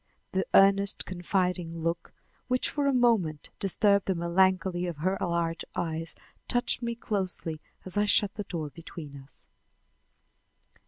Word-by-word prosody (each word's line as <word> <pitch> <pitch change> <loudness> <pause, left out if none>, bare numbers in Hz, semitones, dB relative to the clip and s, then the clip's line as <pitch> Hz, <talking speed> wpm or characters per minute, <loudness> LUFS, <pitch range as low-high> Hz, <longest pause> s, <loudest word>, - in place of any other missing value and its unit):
The 190 0 -1
earnest, 195 0 +4
confiding 180 -2 -1
look, 170 +1 -2 0.4
which 255 0 +1
for 290 -1 0
a - - +4
moment 225 - +2
disturbed 200 +1 +3
the 190 - +1
melancholy 180 +1 +2
of 170 -4 -4
her 185 +6 0
large 170 -1 -1
eyes, 165 -1 -3 0.3
touched 245 0 +1
me 235 -1 -2
closely 185 -8 -3 0.2
as 185 +1 -3
I 205 - +3
shut 205 -1 +3
the 205 -1 -5
door 155 -4 -4
between 160 -3 -9
us. 135 +1 -11
185 Hz, 140 wpm, -28 LUFS, 165-200 Hz, 0.4 s, earnest